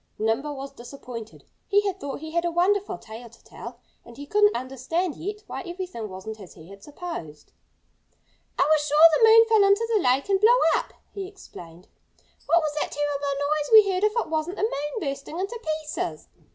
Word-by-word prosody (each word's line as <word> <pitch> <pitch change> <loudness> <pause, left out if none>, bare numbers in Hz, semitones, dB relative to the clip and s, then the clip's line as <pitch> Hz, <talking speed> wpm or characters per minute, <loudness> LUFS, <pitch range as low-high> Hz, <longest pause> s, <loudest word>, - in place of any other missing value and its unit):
Nimble 230 +7 -1
was 275 0 -7
disappointed. 240 -3 -10 0.2
He 410 0 +4
had 385 -1 -2
thought 285 -4 -6
he 315 0 -7
had 340 +1 0
a 345 - 0
wonderful 370 +2 +1
tale 230 -1 -11
to 235 - -21
tell. - - -10 0.3
And 235 0 -15
he 285 - -8
couldn't 415 +5 +3
understand 270 +7 -2
yet 410 +7 -6
why - - -6
everything 350 - -6
wasn't 195 +4 -8
as 190 -4 -12
he 165 +1 -14
had 200 0 -13
supposed. 290 - -8 1.1
"I - - +4
was 310 0 +3
sure 305 +3 +7
the 445 +8 +5
moon 455 +1 +8
fell 440 -2 +5
into 400 +3 +3
the 420 - +3
lake 260 +3 +2
and 390 -1 +1
blew 470 +3 +6 0.2
up," - - -3 0.2
he 390 -2 -5
explained. 180 - -13 0.6
"What 340 +1 +4
was 305 -1 -2
that - - -3
terrible 285 -1 -2
noise 295 0 -1
we 425 -3 +8
heard 370 +1 -1
if 425 0 +3
it 465 - 0
wasn't 320 +4 -2
the - - -2
moon 295 -2 -2
bursting 280 +2 -5
into 410 +5 -4 0.2
pieces?" 165 - -5
305 Hz, 195 wpm, -25 LUFS, 255-390 Hz, 1.1 s, moon